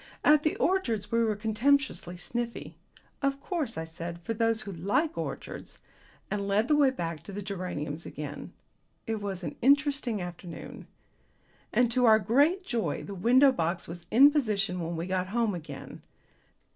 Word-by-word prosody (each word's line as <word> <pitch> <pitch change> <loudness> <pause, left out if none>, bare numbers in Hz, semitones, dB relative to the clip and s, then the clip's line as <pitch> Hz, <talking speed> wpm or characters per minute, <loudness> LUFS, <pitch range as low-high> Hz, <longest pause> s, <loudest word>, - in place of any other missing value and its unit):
At 300 0 +6
the 305 - 0
orchids 235 - 0
we 230 0 +3
were 220 -2 +1
contemptuously 220 -3 +1
sniffy. 235 +7 -4 0.5
"Of 275 -1 0
course," 295 - -3
I 160 - -2
said, 170 +1 -7
"for 225 - -2
those 225 0 +1
who 200 - -6
like 200 - 0
orchids - - -6 0.3
" - - -30
and 200 -1 -1
led 205 +3 +2
the 300 - +4
way 285 -2 +5
back 170 - -4
to 175 - -10
the 205 +1 -5
geraniums 175 -6 -4
again. 145 0 -7 0.5
It 225 -2 -2
was 195 -3 -4
an - - -4
interesting 280 -4 +3
afternoon. 175 -1 -8 0.8
And 240 -1 +3
to 250 +1 +3
our 220 -1 +7
great 285 - +2
joy 235 - -2
the 200 - -7
window 250 +8 +5
box 170 -5 -2
was 170 0 -9
in 275 +6 +7
position 210 - 0
when 170 0 -3
we 165 +1 -3
got 185 0 -1
home 225 +1 0
again. 170 -4 -8
215 Hz, 170 wpm, -29 LUFS, 180-260 Hz, 0.8 s, our